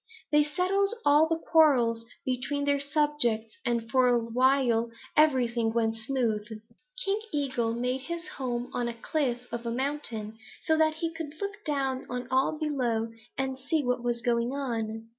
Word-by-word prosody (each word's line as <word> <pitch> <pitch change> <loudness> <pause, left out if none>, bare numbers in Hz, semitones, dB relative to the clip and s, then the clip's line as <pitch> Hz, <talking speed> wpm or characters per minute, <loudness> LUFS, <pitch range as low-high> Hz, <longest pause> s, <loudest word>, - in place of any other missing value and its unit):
They 295 0 +6
settled 385 +7 +1
all 295 +2 +6
the 330 - +1
quarrels 250 -9 +3 0.2
between 265 +3 -1
their 285 0 +2
subjects, 280 -6 +1
and 235 -3 -1
for 255 -1 +4
a 245 -1 +4
while 235 0 +2 0.3
everything 245 -6 +3
went 225 -1 +1
smoothly. 220 -3 -2 0.4
"King 400 +2 +1
Eagle 255 -6 0
made 250 +2 -1
his 340 +4 -5
home 250 -7 -4
on 240 -1 -1
the 235 - -4
cliff 250 -1 -1
of 235 0 -3
a 235 - -3
mountain, 235 -5 -3 0.2
so 315 - +3
that 315 0 +3
he 330 +1 -3
could 320 -1 -7
look 400 +1 -5
down 270 -3 -1
on 245 0 -4
all 265 +4 +2
below 245 -7 -1 0.3
and 265 0 -2
see 295 +3 0
what 250 -1 0
was 240 -1 -1
going 235 0 +1
on. 225 -5 -3
260 Hz, 160 wpm, -28 LUFS, 235-295 Hz, 0.4 s, They